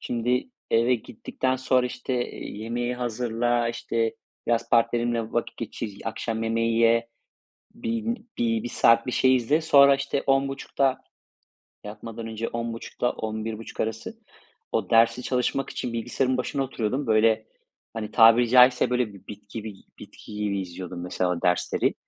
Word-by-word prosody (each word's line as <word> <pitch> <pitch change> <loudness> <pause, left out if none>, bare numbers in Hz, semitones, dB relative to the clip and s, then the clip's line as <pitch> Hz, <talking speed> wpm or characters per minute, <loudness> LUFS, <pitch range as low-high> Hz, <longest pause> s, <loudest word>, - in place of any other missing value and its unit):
Şimdi 125 - -1 0.2
eve 120 +2 +3
gittikten 125 +3 -3
sonra 130 -1 +2
işte, 125 +1 -4 0.2
eee, - - -8
yemeği 120 +3 -2
hazırla, 120 0 -1
işte 115 -1 -1 0.3
biraz 115 0 0
partnerimle 115 -1 +1
vakit 120 - -2
geçir, 105 -2 -6
akşam 115 0 -3
yemeği 115 0 0
ye, 115 0 +3 0.7
bin 230 0 -3
bi 115 -2 +1
bir 120 - -4
saat 115 -1 +4
bir 125 - -2
şey 130 +1 +4
izle. 130 +6 +1
Sonra, 140 -3 +6
işte, 140 0 -2
22.30'da 135 0 +1 0.9
yatmadan 115 +2 -7
önce 115 0 -4
22.30'da 115 +1 -3
23.30 110 0 -5
arası 110 - -4 0.5
o 105 -5 -1
dersi 115 +2 +4
çalışmak 125 +2 -1
için 125 - -4
bilgisayarın 120 +3 -1
başına 135 +2 -1
oturuyordum. 130 +1 -2
Böyle, 110 0 +3 0.5
hani, 110 -2 -4
tabiri 115 +1 +6
caizse 125 +1 +6
böyle 125 -4 0
bir 100 - -16
bit 105 0 -11
gibi 110 -1 -6 0.2
bitki 105 - -12
gibi 100 -1 -1
izliyordum 90 -1 -7
mesela 90 -1 -1
dersleri. 90 0 +1
115 Hz, 140 wpm, -25 LUFS, 110-125 Hz, 0.9 s, Sonra